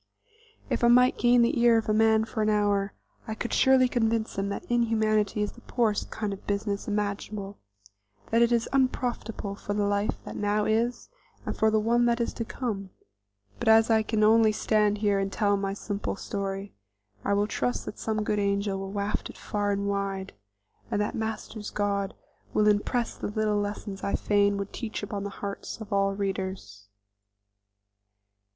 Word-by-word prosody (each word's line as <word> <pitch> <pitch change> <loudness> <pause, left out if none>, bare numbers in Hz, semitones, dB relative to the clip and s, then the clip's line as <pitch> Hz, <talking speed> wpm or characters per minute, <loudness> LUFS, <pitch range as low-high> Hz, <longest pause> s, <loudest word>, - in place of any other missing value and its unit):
If - - -1
I - - +6
might 250 +1 +5
gain 240 0 +5
the 240 +2 +1
ear 235 -1 +6
of 225 - -1
man 220 0 +4
for 220 0 -3
an 215 - +2
hour, 205 -1 +1 0.3
I 220 - -3
could 235 - -4
surely 265 -1 +5
convince 225 -2 0
him 195 +1 -1
that 200 - -5
inhumanity 220 -3 +1
is 205 - -2
the 240 - -17
poorest 225 -5 0
kind 210 -2 -3
of 195 - -11
business 200 0 -2
imaginable; 205 -1 -3 0.7
that 230 +1 +4
it 235 0 +4
is 235 -1 +2
unprofitable 245 -6 -1
for 205 0 -4
the 205 -1 +1
life 205 +1 0
that - - -7
now 205 0 0
is 230 +3 0 0.4
and - - -3
for 220 - +3
the 215 0 +3
one 235 +2 +3
that 235 0 +2
is 235 - -1
to 230 - -3
come; 215 -5 -4 0.7
but - - -3
as 225 +1 +6
I 220 0 +5
can 215 0 0
only 220 0 +6
stand 210 -1 +2
here 205 -1 +2
and 195 0 -1
tell 205 -1 +2
my 195 0 -2
simple 205 0 -3
story, 195 0 -4 0.5
I 200 - +1
will 205 +1 +2
trust 245 +3 -2
that - - -7
some 215 -1 -1
good 210 0 0
angel 200 -1 0
will 195 0 -5
waft 200 0 -2
it - - -11
far 205 -1 -2
and 200 0 0
wide, 195 -1 -2 0.6
and - - 0
that 210 - -1
Master's 220 -1 -4
God 200 -1 -1 0.4
will 210 0 +4
impress 210 +3 +1
the - - -4
little 210 0 0
lessons 205 -1 -4
I 200 - 0
fain 205 -1 +2
would 200 0 -5
teach 225 -3 -5
upon 205 -1 -4
the - - -3
hearts 200 +3 -6
of 220 -1 -6
all 195 0 +2
readers. 190 - -4
210 Hz, 185 wpm, -27 LUFS, 200-225 Hz, 0.7 s, I